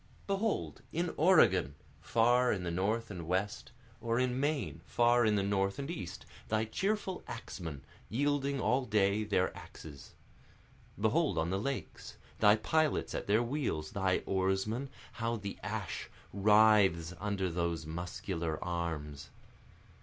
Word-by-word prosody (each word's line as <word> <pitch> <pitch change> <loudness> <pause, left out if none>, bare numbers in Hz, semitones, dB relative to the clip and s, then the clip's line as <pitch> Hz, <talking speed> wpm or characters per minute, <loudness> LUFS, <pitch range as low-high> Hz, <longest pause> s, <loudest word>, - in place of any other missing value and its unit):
Behold, 200 +2 -1
in 170 +1 -1
Oregon, 95 - +4 0.3
far 120 +2 +3
in 95 -3 -2
the 85 - -2
north 105 +6 -1
and 85 -4 -6
west, 95 +3 -2 0.3
Or 115 -1 0
in 125 0 0
Maine, 145 +1 -1
far 120 0 +3
in 105 - +3
the 100 - +1
north 100 0 0
and 140 +3 -4
east, 125 - -6 0.2
thy 110 0 +1
cheerful 190 - -2
axemen, 80 -10 -7 0.3
Wielding 140 +2 0
all 130 +1 +1
day 105 -1 +2
their 95 -3 0
axes. 70 -4 -11 0.8
Behold, 110 - +2
on 80 +2 0
the 95 - 0
lakes, 140 +5 -5 0.2
thy 105 -1 +6
pilots 155 +7 +1
at - - -4
their 105 +4 +3
wheels, 120 - -2
thy 95 -2 0
oarsmen, 95 +7 0 0.2
How 115 -1 -2
the 100 -3 -6
ash 105 -4 -4 0.2
writhes 100 -4 +4
under 100 -3 -1
those 85 -2 -2
muscular 85 0 -4
arms! 75 -5 -4
105 Hz, 135 wpm, -32 LUFS, 90-125 Hz, 0.8 s, thy